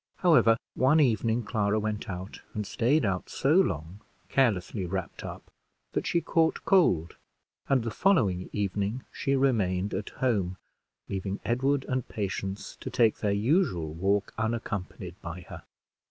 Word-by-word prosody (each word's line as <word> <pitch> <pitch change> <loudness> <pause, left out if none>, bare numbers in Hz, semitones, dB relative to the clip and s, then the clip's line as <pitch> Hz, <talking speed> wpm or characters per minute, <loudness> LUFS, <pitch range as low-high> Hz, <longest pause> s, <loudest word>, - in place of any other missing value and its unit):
However, 155 -11 +5 0.2
one 140 +5 +4
evening 115 -3 +2
Clara 105 0 0
went 105 -1 -3
out, 95 +2 -6
and 105 -1 -2
staid 125 +7 +2
out 95 -2 -1
so 140 +3 +1
long, 90 - +1 0.3
carelessly 105 -6 +1
wrapped 95 -1 -4
up, - - -8 0.4
that - - -2
she 170 - +2
caught 160 -1 +1
cold; 95 - +3 0.5
and 130 -4 +3
the 115 - -3
following 105 - +2
evening 105 +4 -2
she 140 - 0
remained 105 -8 +1
at 100 +2 -3
home, 100 -8 0 0.5
leaving 95 0 -3
Edward 135 +5 +1
and 130 -2 -1
Patience 100 -1 -4
to - - -6
take 115 -2 +3
their 105 - 0
usual 100 - +1
walk 100 +4 0
unaccompanied 105 -5 -3
by 85 +1 -6
her. - - -10
105 Hz, 140 wpm, -28 LUFS, 95-130 Hz, 0.5 s, However